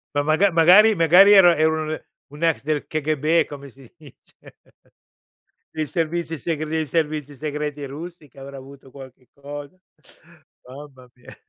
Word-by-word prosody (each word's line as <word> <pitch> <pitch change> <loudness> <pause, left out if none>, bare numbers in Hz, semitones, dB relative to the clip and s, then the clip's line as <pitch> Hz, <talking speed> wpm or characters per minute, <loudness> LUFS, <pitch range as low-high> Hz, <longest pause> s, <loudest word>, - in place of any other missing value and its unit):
Ma 145 - +1
maga 155 +7 +2
magari 180 +6 +6
magari 180 +4 +5
era 175 -3 +7
era 160 +1 +1
un 155 - -5 0.4
un 150 +3 -9
ex 165 -4 0
del 150 0 -3
KGB, 155 +1 0
come 140 -1 -11
si 130 -1 -19
dice, 150 -5 -20 1.4
dei 155 -1 -4
servizi 165 +1 -3
segr 155 +1 -4
dei 160 0 -2
servizi 150 -1 -3
segreti 150 0 -5
russi 155 +3 -10
che 135 - -22
avrà 135 +1 -10
avuto 135 0 -15
qualche 130 -2 -15
cosa, 145 +3 -10 0.9
mamma 130 -1 -13
mia. 125 - -16
150 Hz, 145 wpm, -21 LUFS, 140-165 Hz, 1.4 s, era